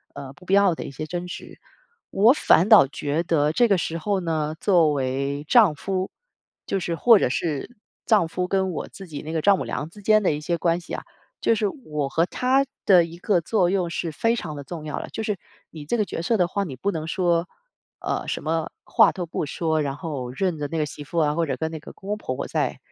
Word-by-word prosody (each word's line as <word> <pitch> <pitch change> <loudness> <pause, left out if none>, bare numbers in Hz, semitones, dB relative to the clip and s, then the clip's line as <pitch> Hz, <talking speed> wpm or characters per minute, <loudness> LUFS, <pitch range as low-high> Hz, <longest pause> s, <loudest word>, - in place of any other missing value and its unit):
呃， 140 -1 -8
不 175 +6 -18
必 185 - -1
要 200 -3 +5
的 - - -6
一 - - -7
些 155 +3 -6
争 175 +2 -5
执。 180 - -9 0.5
我 220 +6 +5
反 190 - +4
倒 215 - +8
觉 145 +3 -2
得 155 -3 +1
这 240 +6 +3
个 195 - +4
时 165 -1 -2
候 200 +3 -1
呢， 160 -3 -1
作 175 -6 +4
为 140 +1 -2
丈 210 -9 +5
夫， 185 +4 -3 0.5
就 - - -1
是 175 -2 -2
或 230 +4 +6
者 - - +1
是 155 - -3 0.3
丈 210 -7 +4
夫 180 +2 -3
跟 190 -1 +1
我 - - -5
自 195 - -11
己 150 -4 -7
那 155 - -7
个 160 -1 -1
丈 200 +3 +5
母 - - -3
娘 150 - -4
之 205 +5 -14
间 215 +1 +4
的 180 - +2
一 150 - -4
些 170 +2 -1
关 170 +1 +1
系 - - -9
啊， - - -4 0.4
就 230 - +2
是 210 -1 0
我 150 - -4
和 165 +4 +2
她 260 +7 +1 0.2
的 180 -4 +6
一 165 +1 -10
个 185 0 +1
作 180 +1 +1
用 185 -2 0
是 170 0 -3
非 230 +9 +1
常 155 -9 -5
地 140 - -6
重 165 -1 -7
要 150 - -4
的。 - - -6
就 220 - -4
是 210 -3 -2 0.3
你 155 -2 -10
这 155 - 0
个 215 - +2
角 195 - -5
色 210 +7 +1
的 180 -4 +2
话， 200 +2 -1
你 140 -7 -6
不 195 +11 -1
能 160 -3 -4
说， 170 0 +1 0.5
呃， - - -2
什 - - -3
么 160 0 -1
话 - - +4
都 180 - -4
不 160 - -3
说， 160 +1 -1
然 140 -2 -2
后 145 -5 -5
任 175 +5 -1
着 145 -1 -3
那 165 - -4
个 155 - +1
媳 145 0 -9
妇 170 +4 -2
啊， 150 -2 +2
或 170 0 +1
者 150 - -2
跟 160 0 -3
那 160 - -6
个 - - -12
公 195 - -11
公 210 - -1
婆 130 -11 -4
婆 - - -4
在 - - -1
170 Hz, 270 characters per minute, -24 LUFS, 150-195 Hz, 0.5 s, 倒